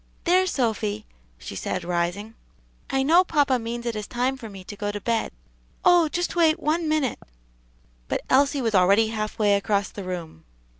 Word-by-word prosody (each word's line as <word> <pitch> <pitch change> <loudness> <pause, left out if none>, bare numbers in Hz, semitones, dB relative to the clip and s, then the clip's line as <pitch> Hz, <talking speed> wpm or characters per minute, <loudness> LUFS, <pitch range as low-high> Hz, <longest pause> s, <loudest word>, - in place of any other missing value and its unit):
"There, 370 +2 +3
Sophy," 220 - -1 0.3
she - - -8
said, 180 - -3
rising, 175 +5 -2 0.6
"I 270 -1 +1
know 335 +6 +5
papa 285 -7 +2
means 235 +1 -5
it 235 -2 -2
is 210 -1 -5
time 250 +2 -1
for 230 -4 -9
me 195 -2 -10
to 205 - -9
go 205 0 -3
to 205 - -5
bed." 230 +2 -1 0.5
"Oh, 350 -3 +5
just 350 +3 -2
wait 325 -2 +3
one 315 +2 0
minute!" 305 -5 0 0.9
But - - -2
Elsie 275 0 +3
was 225 -2 0
already 200 +4 +4
half 215 -1 -4
way 210 -2 +3
across 200 0 0
the 200 - -8
room. 170 - -6
225 Hz, 180 wpm, -24 LUFS, 205-290 Hz, 0.9 s, know